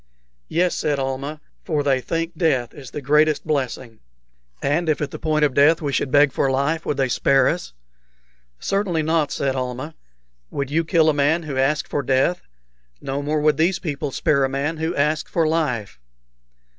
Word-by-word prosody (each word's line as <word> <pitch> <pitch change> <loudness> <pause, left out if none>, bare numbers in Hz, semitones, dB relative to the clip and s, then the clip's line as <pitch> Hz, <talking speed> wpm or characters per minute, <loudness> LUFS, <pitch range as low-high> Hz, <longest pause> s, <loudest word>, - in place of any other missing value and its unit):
"Yes," 175 +2 +1
said 150 -2 -1
Almah; 135 +3 -4 0.2
"for 150 -3 -1
they 135 -2 +2
think 165 +6 -3
death 135 -8 +1
the 145 0 -9
greatest 150 +2 +3
blessing." 130 -6 -3 0.6
"And 160 +4 0
if 155 - +1
at 150 - -3
the - - -7
point 155 -1 +2
of 140 - -1
death 150 +5 +5
we 145 -3 -3
should 130 - 0
beg 145 +1 +5
for 135 - 0
life, 140 +5 0
would 145 - -1
they 135 -1 +2
spare 135 +1 +3
us?" 170 - -2 0.9
"Certainly 190 -5 0
not," 160 -1 +1
said 135 -1 -1
Almah. 130 +4 -4 0.6
"Would 140 -1 -4
you 165 +2 +2
kill 160 0 +3
a 155 - +4
man 150 +4 +2
who 150 -3 -5
asked 140 +3 +1
for 145 - -1
death? 135 +7 +1 0.6
No 135 +1 -3
more 150 +1 -1
would 150 -1 +3
these 175 +4 +2
people 150 -5 -4
spare 140 +1 +1
a 135 - +1
man 140 +4 -2
who 160 +2 -2
asked 150 +2 0
for 165 -2 +1
life." 125 - -1
150 Hz, 180 wpm, -22 LUFS, 135-160 Hz, 0.9 s, death